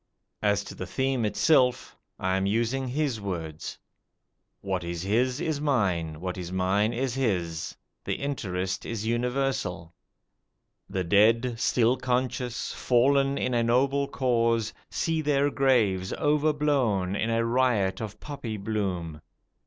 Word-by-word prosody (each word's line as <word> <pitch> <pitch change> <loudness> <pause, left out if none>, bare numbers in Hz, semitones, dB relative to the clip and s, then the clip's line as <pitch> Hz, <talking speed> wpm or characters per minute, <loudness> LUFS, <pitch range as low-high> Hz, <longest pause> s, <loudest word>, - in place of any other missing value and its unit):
As 105 -1 +2
to - - -9
the 95 - -6
theme 130 +3 0
itself 125 +2 +2 0.2
I 95 0 0
am 95 0 0
using 120 +5 0
his 130 -4 -1
words: 80 -6 -5 0.8
what 95 -3 -2
is 85 0 -4
his 125 +7 +1
is 160 -4 -2
mine; 90 - 0
what 90 +1 -4
is 90 -1 -6
mine 95 +4 +1
is 125 +1 -1
his 90 -11 -1 0.3
the - - -2
interest 95 -9 -3
is 110 -2 -4
universal. 120 -8 -1 1.0
The 95 - -1
dead, 115 +6 +3
still 125 0 +3
conscious, 125 -1 -2
fallen 135 +3 +2
in 125 - -1
a 120 - +2
noble 135 +4 +2
cause, 115 -4 +1 0.2
see 165 -1 -1
their 145 -1 +2
graves 110 -10 +2
overblown 145 - +1
in 110 +3 -1
a 115 0 +1
riot 115 -6 +1
of 105 -1 -6
poppy 125 -7 -5
bloom. 95 -7 -3
115 Hz, 130 wpm, -27 LUFS, 95-130 Hz, 1.0 s, dead